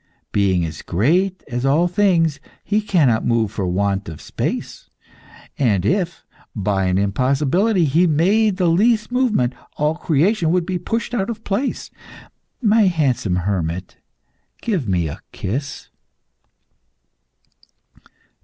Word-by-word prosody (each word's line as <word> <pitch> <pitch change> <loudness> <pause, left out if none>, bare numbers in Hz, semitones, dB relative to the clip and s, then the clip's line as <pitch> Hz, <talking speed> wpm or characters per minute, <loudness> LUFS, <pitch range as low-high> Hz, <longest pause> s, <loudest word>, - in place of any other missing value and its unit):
Being 95 -4 +2
as 80 -4 -7
great 175 - +1
as 120 +1 -3
all 150 +6 +3
things, 175 -5 +2 0.2
he 210 +1 +1
cannot 150 - +2
move 115 -3 +1
for 100 -3 -3
want 100 +1 -1
of 80 - -9
space, - - -5 0.7
and 105 -9 +2
if, 180 - -1 0.3
by 100 -2 0
an 90 0 +1
impossibility, 140 - +1
he 165 +6 +3
made 190 +6 +2
the 185 - +1
least 215 +7 +2
movement, 225 - +1 0.2
all 150 +1 +1
creation 170 +3 +1
would 175 0 +1
be 180 -1 -2
pushed 230 +7 -3
out 205 -2 -1
of 225 -1 -6
place. 215 +7 -2 0.7
My 215 -1 +4
handsome 135 - 0
hermit, 90 -2 -3 0.6
give 185 - -2
me 90 -4 0
a 70 - -7
kiss." 140 +9 -5
155 Hz, 125 wpm, -20 LUFS, -, 0.7 s, My